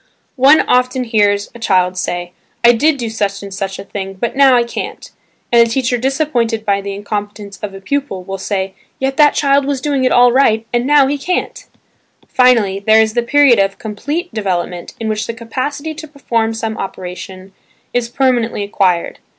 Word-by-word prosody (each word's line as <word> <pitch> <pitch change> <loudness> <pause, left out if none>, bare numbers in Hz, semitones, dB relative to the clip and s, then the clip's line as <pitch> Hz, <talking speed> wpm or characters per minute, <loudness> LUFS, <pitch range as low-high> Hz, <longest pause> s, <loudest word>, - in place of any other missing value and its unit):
One 275 +4 +6
often 250 +1 +1
hears 205 -3 +1
a 235 - -12
child 185 -4 +1
say, 175 -1 -4 0.3
"I 235 - +8
did 285 +6 +2
do 240 -3 -3
such 205 -3 -3
and 200 -1 -8
such 195 -1 -4
a - - -7
thing 195 -1 -6
but 235 +7 -3
now 270 -2 +6
I 240 - +3
can't!" 235 - -7 0.4
and 235 -1 +6
a 230 - +3
teacher 250 +1 0
disappointed 245 -4 -1
by 200 -1 +1
the 200 0 -5
incompetence 205 0 -6
of 200 -2 -6
a 195 - -10
pupil 275 -4 -3
will 195 +1 -6
say, 190 -1 -3 0.2
"Yet 270 0 -2
that 295 -1 +5
child 280 -1 +2
was 280 -1 -1
doing 275 -1 -1
it 255 - +2
all 245 0 +5
right–and 240 -1 +1
now 290 -1 +5
he 285 +1 -1
can't!" 360 +6 -3 0.6
Finally 230 -7 +3
there 220 +2 +4
is 220 -1 +2
the 240 - +1
period 265 -1 +4
of 195 0 +1
complete 290 - -4
development 180 -4 -3
in 225 - -3
which 215 0 -2
the 230 - -4
capacity 275 +7 -4
to 315 +1 -9
perform 230 -6 -2
some 225 -1 -4
operation 185 0 -7 0.4
is 245 -1 -1
permanently 240 -4 0
acquired. 190 -4 0
225 Hz, 185 wpm, -16 LUFS, 200-265 Hz, 0.6 s, I